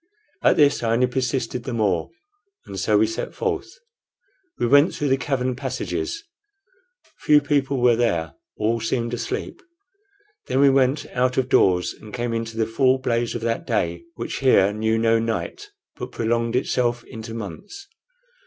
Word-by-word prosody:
At - - +4
this 145 -2 +4
I 115 -1 +1
only 125 +2 +3
persisted 125 -1 -2
the 125 -2 -4
more, 95 -7 0 0.6
and 95 - -6
so 105 +3 +2
we 110 - +4
set 115 +1 -5
forth. - - -3 0.8
We - - 0
went 145 +6 +5
through 145 - -1
the 135 - +4
cavern 130 -2 -1
passages. 330 - -4 1.0
Few 150 -1 +5
people 140 -2 0
were 120 -1 +4
there; 85 -10 0 0.2
all 115 +2 0
seemed 115 +1 -2
asleep. 120 - -4 0.9
Then 130 - 0
we 140 0 +6
went 135 +2 +2
out 125 0 +1
of 130 -1 +1
doors 90 -7 +3
and 105 - -13
came 120 -1 -2
into 115 0 -4
the 110 - +2
full 130 +3 +2
blaze 120 -2 -1
of - - -4
that 115 0 -2
day 85 -7 -1
which - - -4
here 105 -7 +4
knew 110 +1 0
no 115 0 +3
night, 115 - -3 0.3
but 125 - -6
prolonged 115 +1 -1
itself 120 -2 0
into 115 0 -8
months. 115 - -8
120 Hz, 160 wpm, -23 LUFS, 115-130 Hz, 1.0 s, we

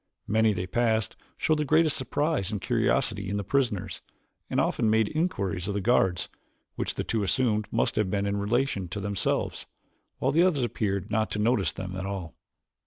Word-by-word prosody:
Many 110 +1 +3
they 90 -3 -2
passed 110 +2 0 0.2
showed 155 -1 +1
the - - +2
greatest 155 +1 +3
surprise 145 - -1
and 105 - -2
curiosity 115 -3 +1
in 100 - -1
the 100 - -2
prisoners, 120 -4 -1 0.5
and - - 0
often 110 - +1
made 110 -1 +3
inquiries 100 - -1
of 100 - -2
the - - +1
guards, 95 -5 +2 0.5
which - - -3
the - - -2
two 110 - -1
assumed 105 0 +1
must - - 0
have 105 -3 +2
been 100 +1 0
in 100 0 -1
relation 105 -1 0
to 95 +4 -5
themselves, 100 0 -1 0.5
while 135 - +1
others 170 -8 +3
appeared 100 -5 -2
not 110 0 +1
to - - -3
notice 110 -1 +2
them 95 -1 -6
at 95 +1 -4
all. 95 -5 -5
105 Hz, 180 wpm, -27 LUFS, 100-125 Hz, 0.5 s, Many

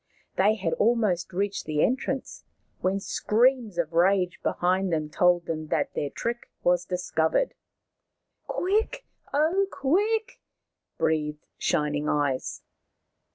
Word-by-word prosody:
They 210 +3 +4
had 205 - -1
almost 210 -6 +2
reached 195 +2 -2
the 150 -1 +1
entrance 265 +1 -1 0.4
when 190 +2 0
screams 230 0 +1
of 170 -1 -1
rage 180 +1 +3
behind 185 +1 +1
them 155 -2 -1
told 175 0 +3
them 155 -2 -4
that - - 0
their 145 - -2
trick 240 +8 -4
was 175 0 +3
discovered. 180 - 0 0.5
" - - -51
Quick, 440 +7 0 0.3
oh, 330 +7 +2
quick! 415 - 0 0.3
" - - -58
breathed 150 -1 -1
Shining 150 0 0
Eyes. 145 -3 -1
185 Hz, 120 wpm, -27 LUFS, 160-250 Hz, 0.5 s, They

